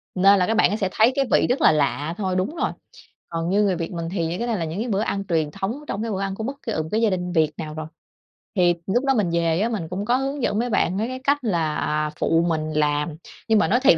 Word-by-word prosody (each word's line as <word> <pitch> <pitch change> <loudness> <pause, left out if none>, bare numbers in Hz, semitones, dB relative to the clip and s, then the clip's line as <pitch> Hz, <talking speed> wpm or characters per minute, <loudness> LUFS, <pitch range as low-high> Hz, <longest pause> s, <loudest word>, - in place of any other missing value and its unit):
nên 195 +2 +5
các 225 - +1
bạn 215 -1 +3
sẽ 195 -3 -1
thấy 220 +5 +4
cái 275 - +2
vị - - +4
rất 275 +5 +1
là - - +7
lạ 150 +1 0
thôi 190 -3 -1
đúng 190 - -1
rồi. - - 0 0.6
Còn 165 0 -2
như 205 +2 +3
người 195 -3 +2
Việt 165 +1 -4
mình 170 -2 -4
thì 175 -4 -1
những 175 +3 -3
cái 235 - -2
này 230 -3 0
là 165 - -2
những 205 +9 -3
bữa 200 0 +1
ăn 195 -2 -2
truyền 160 -3 +1
thống 230 - -4
trong 200 - -3
cái 225 -1 -2
bữa 195 0 -2
ăn 195 -1 -2
của 220 - -5
bất 275 +4 -5
kỳ, 225 - -3
ờ, 160 - -1
một 160 - -8
gia 225 - +4
đình 180 -1 -2
Việt 155 -2 +3
nào 155 -1 -5
rồi. 155 0 -6 0.7
Thì 175 -2 +4
lúc 245 +8 +1
đó 270 - +3
mình 200 -5 +1
về 170 0 +1
á, 225 - +1
mình 195 -9 -3
cũng 195 +4 -3
có 245 +3 +3
hướng 270 0 -3
dẫn 205 +2 +1
mấy 245 - 0
bạn 190 -4 +1
mấy 220 +3 0
cái 255 +1 -5
cách 285 +1 +2
là 155 -5 0
phụ 165 +1 +2
mình 155 -1 -1
làm. 150 0 0 0.3
Nhưng 220 -2 +4
mà - - +3
nói 240 +5 +3
thiệt 165 - +6
190 Hz, 285 wpm, -23 LUFS, 165-225 Hz, 0.7 s, là